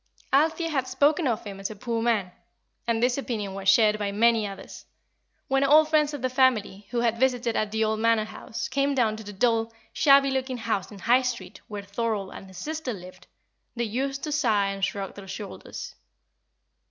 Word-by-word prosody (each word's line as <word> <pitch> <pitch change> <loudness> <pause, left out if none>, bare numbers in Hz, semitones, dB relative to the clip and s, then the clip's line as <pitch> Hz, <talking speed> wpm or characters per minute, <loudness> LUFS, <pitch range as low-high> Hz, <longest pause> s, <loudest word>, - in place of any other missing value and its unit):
Althea 320 +4 +2
had 265 -4 0
spoken 295 +3 +2
of 230 -4 -1
him 200 -2 -8
as 195 - -3
a 215 - -8
poor 230 +2 -2
man, 220 -6 +1 0.6
and 230 0 +1
this 250 +2 +2
opinion 215 -7 -3
was 195 0 0
shared 215 +1 +5
by 205 -1 -1
many 225 +1 +3
others. 195 -1 -10 0.6
When 270 +1 +2
old 305 +3 +6
friends 305 -2 +3
of 270 - -8
the - - +3
family, 230 -6 +1
who 240 -1 -1
had 230 -1 +1
visited 245 -3 +1
at 215 - 0
the 220 0 +1
old 215 0 0
Manor 230 -1 +3
House, 220 - -6
came 280 0 0
down 225 -4 +2
to 220 - -8
the 205 - -8
dull, 225 +2 +1 0.2
shabby 275 -1 +5
looking 260 -1 -2
house 220 -4 -2
in 205 - -10
High 245 +6 +3
Street, 250 -2 -5
where 205 -1 -6
Thorold 200 -1 -2
and 195 - -10
his 190 -1 -13
sister 310 -5 -4
lived, 185 -2 -12 0.5
they 235 - -1
used 270 +5 -2
to 305 - -3
sigh 220 -9 +2
and 195 0 -5
shrug 195 0 -2
their 200 -1 -11
shoulders. 200 +2 -7
230 Hz, 200 wpm, -26 LUFS, 205-265 Hz, 0.6 s, old